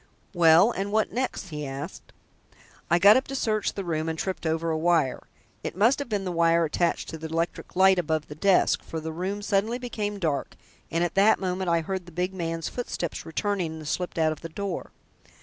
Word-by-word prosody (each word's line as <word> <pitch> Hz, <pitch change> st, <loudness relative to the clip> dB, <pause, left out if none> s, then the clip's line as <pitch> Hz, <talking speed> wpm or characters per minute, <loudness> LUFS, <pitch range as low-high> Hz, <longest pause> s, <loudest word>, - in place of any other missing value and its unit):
"Well, 170 Hz, +4 st, +6 dB
and 200 Hz, -2 st, -3 dB
what 215 Hz, 0 st, +1 dB
next?" 245 Hz, -5 st, -3 dB
he 150 Hz, -2 st, -5 dB
asked. 135 Hz, 0 st, -7 dB, 0.8 s
"I 170 Hz, -, +5 dB
got 200 Hz, +6 st, +7 dB
up 265 Hz, -, -1 dB
to 275 Hz, -, -5 dB
search 215 Hz, -5 st, 0 dB
the 195 Hz, -, -3 dB
room 160 Hz, -2 st, -2 dB
and 160 Hz, -, -3 dB
tripped 185 Hz, -1 st, -3 dB
over 165 Hz, +1 st, 0 dB
a 160 Hz, -, 0 dB
wire. 165 Hz, -5 st, +1 dB, 0.4 s
It -, -, -4 dB
must 230 Hz, +8 st, +4 dB
have 285 Hz, -3 st, -4 dB
been 205 Hz, -3 st, -1 dB
the 180 Hz, -, -2 dB
wire 170 Hz, 0 st, +3 dB
attached 170 Hz, +2 st, 0 dB
to 160 Hz, -, -7 dB
the 160 Hz, -, -5 dB
electric 165 Hz, +1 st, -3 dB
light 190 Hz, 0 st, +5 dB
above 160 Hz, -2 st, -1 dB
the -, -, -7 dB
desk, 190 Hz, +5 st, +3 dB
for 160 Hz, -, -6 dB
the 160 Hz, +1 st, -5 dB
room 195 Hz, +5 st, -3 dB
suddenly 210 Hz, +3 st, +1 dB
became 215 Hz, -5 st, -4 dB
dark, 155 Hz, -7 st, -2 dB, 0.3 s
and 165 Hz, +1 st, 0 dB
at 175 Hz, -, -1 dB
that 200 Hz, +3 st, +5 dB
moment 185 Hz, -1 st, -2 dB
I 170 Hz, 0 st, +3 dB
heard 185 Hz, +2 st, -4 dB
the -, -, -11 dB
big 180 Hz, +3 st, -2 dB
man's 165 Hz, -2 st, -3 dB
footsteps 175 Hz, -10 st, -4 dB
returning 180 Hz, 0 st, -1 dB
and 155 Hz, -2 st, -8 dB
slipped 180 Hz, +3 st, -3 dB
out 160 Hz, -1 st, +3 dB
of 155 Hz, -, -6 dB
the 165 Hz, -, -6 dB
door. 195 Hz, +2 st, -4 dB
175 Hz, 215 wpm, -26 LUFS, 160-200 Hz, 0.8 s, got